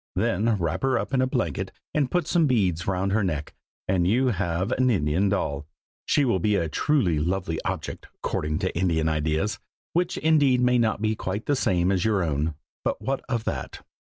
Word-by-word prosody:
Then 110 Hz, +3 st, +1 dB
wrap 85 Hz, -4 st, -2 dB
her 135 Hz, -1 st, +2 dB
up -, -, -4 dB
in 130 Hz, -, +3 dB
a 130 Hz, -, +2 dB
blanket 85 Hz, -, -2 dB, 0.2 s
and 145 Hz, -4 st, +1 dB
put 175 Hz, +1 st, +1 dB
some 165 Hz, -1 st, +2 dB
beads 95 Hz, -, +1 dB
round 95 Hz, +1 st, 0 dB
her 105 Hz, +1 st, +2 dB
neck, 75 Hz, -5 st, -3 dB, 0.3 s
and 90 Hz, -2 st, +2 dB
you 125 Hz, +6 st, +3 dB
have 95 Hz, 0 st, -1 dB
an 130 Hz, 0 st, +2 dB
Indian 95 Hz, -1 st, +2 dB
doll. 75 Hz, -7 st, -2 dB, 0.4 s
She 145 Hz, -, +3 dB
will 115 Hz, -7 st, +2 dB
be 105 Hz, +3 st, +2 dB
a 85 Hz, -4 st, +1 dB
truly 90 Hz, -, +1 dB
lovely 85 Hz, 0 st, -1 dB
object, -, -, -4 dB
according 75 Hz, 0 st, -2 dB
to 95 Hz, -, -2 dB
Indian 85 Hz, -3 st, +1 dB
ideas, 80 Hz, +6 st, 0 dB, 0.3 s
which 175 Hz, +1 st, 0 dB
indeed 145 Hz, -5 st, +3 dB
may 125 Hz, 0 st, +3 dB
not 110 Hz, -2 st, +1 dB
be 110 Hz, 0 st, +1 dB
quite 100 Hz, +2 st, -4 dB
the 145 Hz, -, +2 dB
same 90 Hz, -7 st, +1 dB
as 95 Hz, -2 st, +1 dB
your 105 Hz, -4 st, +2 dB
own, 75 Hz, 0 st, -1 dB, 0.3 s
but -, -, -1 dB
what 135 Hz, 0 st, -2 dB
of 115 Hz, -3 st, -1 dB
that?" -, -, -5 dB
100 Hz, 195 wpm, -25 LUFS, 85-125 Hz, 0.4 s, in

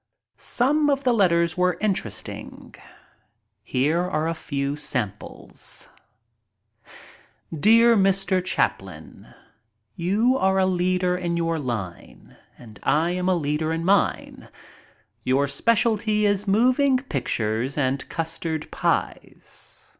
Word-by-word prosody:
Some 295 Hz, +4 st, +1 dB
of 280 Hz, -1 st, 0 dB
the 250 Hz, -2 st, +3 dB
letters 170 Hz, -6 st, +2 dB
were 180 Hz, 0 st, +2 dB
most 175 Hz, -, -13 dB
interesting. 120 Hz, -, -4 dB, 0.9 s
Here 140 Hz, +9 st, 0 dB
are 160 Hz, -3 st, -1 dB
a 165 Hz, -, 0 dB
few 140 Hz, -3 st, -3 dB
samples: 115 Hz, -9 st, -6 dB, 1.7 s
Dear 230 Hz, +7 st, +5 dB
Mr. 195 Hz, -2 st, +2 dB
Chaplin, -, -, -3 dB, 0.4 s
— 110 Hz, -1 st, -50 dB
You 240 Hz, +7 st, +2 dB
are 190 Hz, 0 st, +2 dB
a 190 Hz, -, +3 dB
leader 180 Hz, 0 st, +1 dB
in 175 Hz, -1 st, -2 dB
your 165 Hz, -1 st, -1 dB
line 110 Hz, -, -6 dB, 0.2 s
and 110 Hz, -4 st, -14 dB
I 160 Hz, +3 st, +1 dB
am 180 Hz, +1 st, -1 dB
a 185 Hz, -, +3 dB
leader 155 Hz, 0 st, -1 dB
in 165 Hz, +1 st, -2 dB
mine. 195 Hz, +1 st, 0 dB, 0.7 s
Your 135 Hz, +2 st, +1 dB
specialty 215 Hz, -, +1 dB
is 205 Hz, 0 st, +1 dB
moving 255 Hz, +6 st, +3 dB
pictures 120 Hz, -, -2 dB
and 135 Hz, -1 st, -1 dB
custard 165 Hz, -1 st, -4 dB
pies. -, -, -3 dB
175 Hz, 115 wpm, -24 LUFS, 145-205 Hz, 1.7 s, Dear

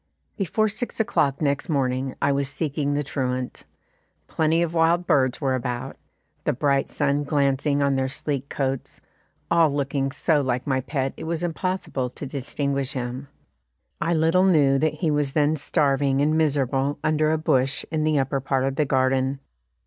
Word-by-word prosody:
Before 215 Hz, +2 st, +1 dB
six 215 Hz, +4 st, -4 dB
o'clock 145 Hz, -9 st, +1 dB
next 140 Hz, +2 st, 0 dB
morning 130 Hz, -2 st, 0 dB
I 140 Hz, -, +2 dB
was 140 Hz, 0 st, 0 dB
seeking 145 Hz, -1 st, -1 dB
the 145 Hz, -, 0 dB
truant. 130 Hz, -3 st, -3 dB, 0.6 s
Plenty 160 Hz, +1 st, +1 dB
of 170 Hz, -1 st, -3 dB
wild 170 Hz, +2 st, +3 dB
birds 130 Hz, -5 st, +2 dB
were 135 Hz, -3 st, 0 dB
about, 125 Hz, +1 st, -3 dB, 0.5 s
the -, -, +1 dB
bright 140 Hz, +1 st, +1 dB
sun 145 Hz, 0 st, 0 dB
glancing 140 Hz, 0 st, +1 dB
on 140 Hz, 0 st, +2 dB
their 130 Hz, 0 st, 0 dB
sleek 140 Hz, 0 st, -3 dB
coats 135 Hz, -2 st, -3 dB, 0.5 s
all 165 Hz, -3 st, +4 dB
looking 140 Hz, -1 st, -1 dB
so 145 Hz, +2 st, +1 dB
like 125 Hz, -2 st, -1 dB
my 130 Hz, -2 st, 0 dB
pet 135 Hz, 0 st, -2 dB
it -, -, -7 dB
was 165 Hz, +1 st, -2 dB
impossible 175 Hz, -6 st, -2 dB
to 135 Hz, -, -8 dB
distinguish 140 Hz, 0 st, -2 dB
him. 125 Hz, +1 st, -4 dB, 0.7 s
I 170 Hz, 0 st, +1 dB
little 165 Hz, +4 st, +3 dB
knew 140 Hz, -6 st, +4 dB
that 155 Hz, +1 st, +1 dB
he 165 Hz, -5 st, 0 dB
was 145 Hz, -2 st, 0 dB
then 150 Hz, 0 st, +2 dB
starving 140 Hz, -2 st, +1 dB
and 150 Hz, +2 st, +2 dB
miserable 140 Hz, -2 st, +1 dB
under 155 Hz, 0 st, +2 dB
a 160 Hz, -, +2 dB
bush 135 Hz, -3 st, 0 dB
in 155 Hz, -1 st, 0 dB
the 155 Hz, -1 st, +2 dB
upper 135 Hz, 0 st, 0 dB
part 135 Hz, 0 st, 0 dB
of 135 Hz, 0 st, -2 dB
the 150 Hz, -, +2 dB
garden. 130 Hz, 0 st, +1 dB
140 Hz, 170 wpm, -24 LUFS, 135-155 Hz, 0.7 s, all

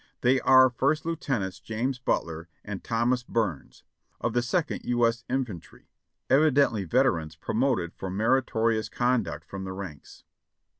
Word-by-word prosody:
They 130 Hz, +2 st, +4 dB
are 130 Hz, -1 st, +6 dB
First 140 Hz, +6 st, 0 dB
Lieutenants 125 Hz, -, -2 dB
(James) 115 Hz, +6 st, -3 dB
Butler 85 Hz, -8 st, -2 dB, 0.2 s
and 100 Hz, -2 st, -6 dB
(Thomas) 120 Hz, +2 st, +1 dB
Burns 110 Hz, -, -3 dB
(Byrne?) -, -, -46 dB
of 115 Hz, -, -1 dB
the 120 Hz, -, +2 dB
Second 140 Hz, +7 st, -1 dB
U. 120 Hz, -1 st, +2 dB
S. 115 Hz, +1 st, 0 dB
Infantry, 125 Hz, -9 st, -5 dB, 0.4 s
evidently 140 Hz, -7 st, +3 dB
veterans 85 Hz, -, +1 dB
promoted 105 Hz, -, -1 dB
for 95 Hz, -, -6 dB
meritorious 115 Hz, +1 st, +1 dB
conduct 115 Hz, -12 st, 0 dB
from 95 Hz, -1 st, -7 dB
the 95 Hz, 0 st, -5 dB
ranks. 95 Hz, -7 st, -9 dB
115 Hz, 140 wpm, -27 LUFS, 95-130 Hz, 0.4 s, are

